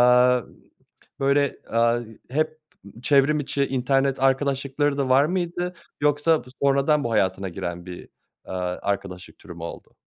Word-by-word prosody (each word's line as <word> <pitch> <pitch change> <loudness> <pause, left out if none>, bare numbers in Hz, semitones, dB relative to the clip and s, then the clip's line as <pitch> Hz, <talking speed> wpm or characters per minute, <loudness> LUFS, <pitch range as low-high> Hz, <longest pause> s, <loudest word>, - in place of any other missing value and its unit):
aaa, 125 0 +5 0.8
böyle, 140 0 +2 0.2
ııı, 115 0 +2 0.2
hep 155 +3 -1 0.4
çevrim 145 +2 +4
içi 140 0 -1
internet 135 +1 +1
arkadaşlıkları 140 +1 +1
da 135 -2 0
var 135 +3 +5
mıydı 175 +1 -2 0.3
yoksa 150 +2 +2
bu 125 - -14
sonradan 140 +2 +3
bu 115 - -2
hayatına 95 -3 +1
giren 85 -1 -5
bir, 90 -1 -9 0.4
ııı, 95 - -5 0.3
arkadaşlık 95 -3 -4
türü 90 - -11
mü 85 -1 -10
oldu? 85 - -9
135 Hz, 135 wpm, -24 LUFS, 115-145 Hz, 0.8 s, aaa